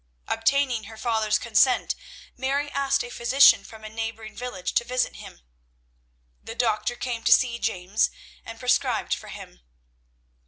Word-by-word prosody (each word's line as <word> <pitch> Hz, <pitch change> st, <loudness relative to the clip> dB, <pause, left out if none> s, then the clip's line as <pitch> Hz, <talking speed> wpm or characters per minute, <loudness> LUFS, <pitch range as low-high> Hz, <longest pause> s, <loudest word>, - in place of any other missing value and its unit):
Obtaining 240 Hz, 0 st, +1 dB
her 220 Hz, +2 st, -11 dB
father's 220 Hz, -2 st, +1 dB
consent, 235 Hz, +3 st, +2 dB, 0.4 s
Mary 280 Hz, +3 st, -1 dB
asked 275 Hz, 0 st, +1 dB
a 245 Hz, -, -8 dB
physician 250 Hz, +4 st, +5 dB
from 220 Hz, -1 st, -13 dB
a -, -, -6 dB
neighbouring 225 Hz, 0 st, -6 dB
village 245 Hz, -8 st, -5 dB
to -, -, +2 dB
visit 250 Hz, +1 st, -1 dB
him. -, -, -12 dB, 1.0 s
The 225 Hz, -, -8 dB
doctor 220 Hz, 0 st, 0 dB
came 240 Hz, -2 st, -4 dB
to -, -, +2 dB
see 235 Hz, -2 st, +4 dB
James 195 Hz, -1 st, 0 dB, 0.3 s
and 225 Hz, 0 st, -10 dB
prescribed 250 Hz, -1 st, +1 dB
for -, -, -5 dB
him. -, -, -11 dB
235 Hz, 145 wpm, -25 LUFS, 220-255 Hz, 1.0 s, physician